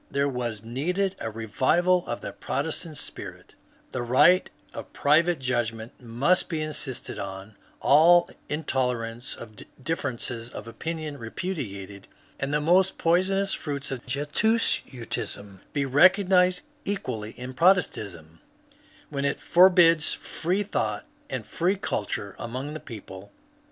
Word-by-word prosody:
There 140 Hz, 0 st, +1 dB
was 120 Hz, -5 st, -3 dB
needed 180 Hz, +12 st, -1 dB
a -, -, -5 dB
^^ 110 Hz, -, -13 dB
revival 170 Hz, -, +2 dB
of -, -, -3 dB
the -, -, -5 dB
Protestant 155 Hz, +2 st, -3 dB
spirit; -, -, -6 dB, 0.2 s
" -, -, -33 dB
the 130 Hz, -, -3 dB
right 130 Hz, +10 st, +5 dB, 0.2 s
of -, -, -8 dB
private 165 Hz, +4 st, +3 dB
judgment 120 Hz, -3 st, -2 dB
must 125 Hz, +10 st, +1 dB
be 160 Hz, -3 st, -2 dB
insisted 145 Hz, -4 st, -3 dB
on, 100 Hz, +2 st, -7 dB, 0.3 s
all 170 Hz, +4 st, +6 dB, 0.2 s
intolerance 125 Hz, -5 st, -2 dB
of 110 Hz, -3 st, -11 dB, 0.2 s
differences 130 Hz, -5 st, -3 dB
of 120 Hz, -, -8 dB
opinion 155 Hz, +3 st, -5 dB
repudiated, 105 Hz, -, -5 dB, 0.3 s
and 135 Hz, +1 st, -2 dB
the 150 Hz, -, +2 dB
most 180 Hz, +5 st, +3 dB
poisonous 190 Hz, +3 st, +2 dB
fruits 140 Hz, -3 st, -4 dB
of 130 Hz, -2 st, -4 dB
Jesuitism 135 Hz, -, -1 dB
be 140 Hz, -1 st, 0 dB
recognized 180 Hz, -, +5 dB, 0.2 s
equally 125 Hz, -, -4 dB
in 125 Hz, +1 st, -6 dB
Protestantism 100 Hz, -, +1 dB, 0.3 s
^* -, -, -31 dB, 0.3 s
when 140 Hz, -1 st, -2 dB
it 140 Hz, -, 0 dB
forbids 175 Hz, -3 st, +5 dB
free 185 Hz, +5 st, -2 dB
thought 205 Hz, -, -2 dB, 0.2 s
and -, -, -4 dB
free 180 Hz, +3 st, 0 dB
culture 100 Hz, -, -3 dB
among 130 Hz, +5 st, -5 dB
the 155 Hz, -, -5 dB
people." 100 Hz, -6 st, -10 dB
140 Hz, 130 wpm, -26 LUFS, 115-175 Hz, 0.3 s, all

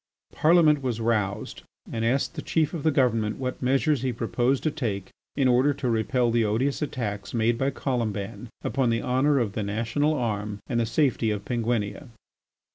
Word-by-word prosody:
Parliament 155 Hz, -3 st, +4 dB
was 125 Hz, -4 st, -2 dB
roused 110 Hz, -3 st, -1 dB, 0.3 s
and 115 Hz, -, -2 dB
asked 130 Hz, +7 st, +1 dB
the 160 Hz, -, -5 dB
Chief 155 Hz, 0 st, 0 dB
of 165 Hz, -, -3 dB
the 155 Hz, -, +3 dB
Government 115 Hz, -7 st, +1 dB
what 130 Hz, -1 st, -4 dB
measures 135 Hz, +2 st, +2 dB
he 130 Hz, -1 st, 0 dB
proposed 120 Hz, +3 st, 0 dB
to 155 Hz, -, +1 dB
take 110 Hz, -11 st, -3 dB, 0.2 s
in 135 Hz, -2 st, +2 dB
order 130 Hz, +3 st, +3 dB
to 130 Hz, -, -3 dB
repel 120 Hz, +2 st, +1 dB
the 115 Hz, 0 st, +2 dB
odious 120 Hz, +8 st, 0 dB
attacks 110 Hz, -8 st, -4 dB
made 115 Hz, +1 st, +2 dB
by 135 Hz, +3 st, 0 dB
Colomban 115 Hz, -5 st, -3 dB
upon 130 Hz, -3 st, +1 dB
the 115 Hz, 0 st, 0 dB
honour 135 Hz, +3 st, +2 dB
of 115 Hz, -6 st, 0 dB
the 110 Hz, -, -2 dB
National 115 Hz, +9 st, 0 dB
Arm 105 Hz, -5 st, -2 dB
and 120 Hz, -3 st, -1 dB
the 115 Hz, -, +1 dB
safety 120 Hz, -2 st, +1 dB
of 105 Hz, -1 st, -3 dB
Penguinia. 120 Hz, +1 st, -2 dB
120 Hz, 180 wpm, -26 LUFS, 110-135 Hz, 0.3 s, Parliament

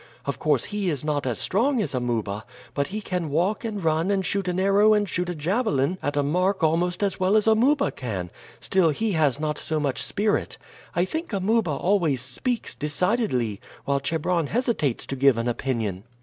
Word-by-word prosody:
Of -, -, -3 dB
course, -, -, +2 dB
he 205 Hz, -3 st, -2 dB
is 150 Hz, -3 st, -3 dB
not 145 Hz, -3 st, -1 dB
as 120 Hz, -, -1 dB
strong 245 Hz, +7 st, +1 dB
as 210 Hz, -, -1 dB
Amuba, 115 Hz, -5 st, -2 dB, 0.3 s
but 140 Hz, -1 st, 0 dB
he 210 Hz, +3 st, -4 dB
can 180 Hz, -5 st, -3 dB
walk 175 Hz, -, 0 dB
and 210 Hz, -4 st, -4 dB
run 160 Hz, +3 st, +1 dB
and 195 Hz, -2 st, +1 dB
shoot 200 Hz, -2 st, -1 dB
an 180 Hz, 0 st, 0 dB
arrow 200 Hz, +3 st, +5 dB
and 205 Hz, -1 st, +1 dB
shoot 180 Hz, +1 st, -2 dB
a 175 Hz, -, -3 dB
javelin 175 Hz, -, 0 dB
at 145 Hz, 0 st, -2 dB
a 145 Hz, -, +3 dB
mark 180 Hz, +5 st, +1 dB
almost 175 Hz, +4 st, +1 dB
as 195 Hz, -2 st, -1 dB
well 185 Hz, +2 st, +3 dB
as 215 Hz, -, +2 dB
Amuba 255 Hz, +6 st, +3 dB
can; 95 Hz, -9 st, -5 dB, 0.3 s
still 185 Hz, -4 st, +2 dB
he 215 Hz, +9 st, -1 dB
has 150 Hz, -6 st, +2 dB
not 150 Hz, -1 st, -2 dB
so 155 Hz, -1 st, -2 dB
much 140 Hz, -3 st, -1 dB
spirit. 210 Hz, +1 st, 0 dB, 0.4 s
I 175 Hz, -, +3 dB
think 320 Hz, -, -4 dB
Amuba 205 Hz, 0 st, +1 dB
always 160 Hz, -2 st, +1 dB
speaks 220 Hz, -, -2 dB
decidedly, 150 Hz, -, 0 dB, 0.3 s
while 140 Hz, 0 st, +1 dB
Chebron 160 Hz, +3 st, 0 dB
hesitates 225 Hz, -, 0 dB
to 135 Hz, -, -4 dB
give 135 Hz, -2 st, +4 dB
an 115 Hz, +1 st, -1 dB
opinion." 115 Hz, -6 st, -2 dB
175 Hz, 190 wpm, -25 LUFS, 140-205 Hz, 0.4 s, arrow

